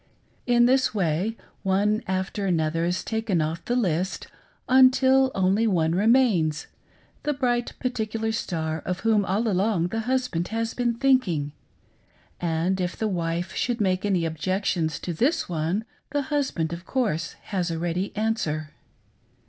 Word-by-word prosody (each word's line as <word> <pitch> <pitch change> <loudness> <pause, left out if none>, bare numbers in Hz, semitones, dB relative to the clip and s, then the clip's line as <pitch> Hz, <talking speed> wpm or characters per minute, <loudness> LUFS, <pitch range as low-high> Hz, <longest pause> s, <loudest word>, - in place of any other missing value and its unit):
In 240 -1 +5
this 260 -1 +3
way, 190 +4 0 0.2
one 205 +3 +1
after 190 +2 -2
another 165 -1 +1
is 180 +2 -1
taken 220 -5 -1
off 160 +2 -2
the 245 - 0
list, 185 -5 0 0.4
until 260 +1 +5
only 195 +4 +2
one 165 -6 +2
remains 195 - +3 0.3
— - - -34
the 295 - 0
bright 245 -3 0
particular 225 -3 -2
star 160 -7 -2
of 180 +3 -4
whom 220 -2 +3
all 200 +4 0
along 190 -3 +1
the 225 - -2
husband 250 -8 -1
has 225 +1 -2
been 240 -1 0
thinking, 230 - +2 0.5
— - - -35
and 175 +3 0
if 180 0 -2
the 220 - 0
wife 170 -1 -2
should 245 -1 -1
make 185 -2 +1
any 190 -5 +1
objections 165 0 -1
to 175 - -4
this 255 - +1
one, 170 +6 -1 0.2
the 285 0 -1
husband, 180 - 0
of 170 +1 -7
course, 200 - -1 0.2
has 180 -3 0
a 165 - -2
ready 175 +3 -2
answer. 165 -9 -1
195 Hz, 150 wpm, -25 LUFS, 170-230 Hz, 0.5 s, In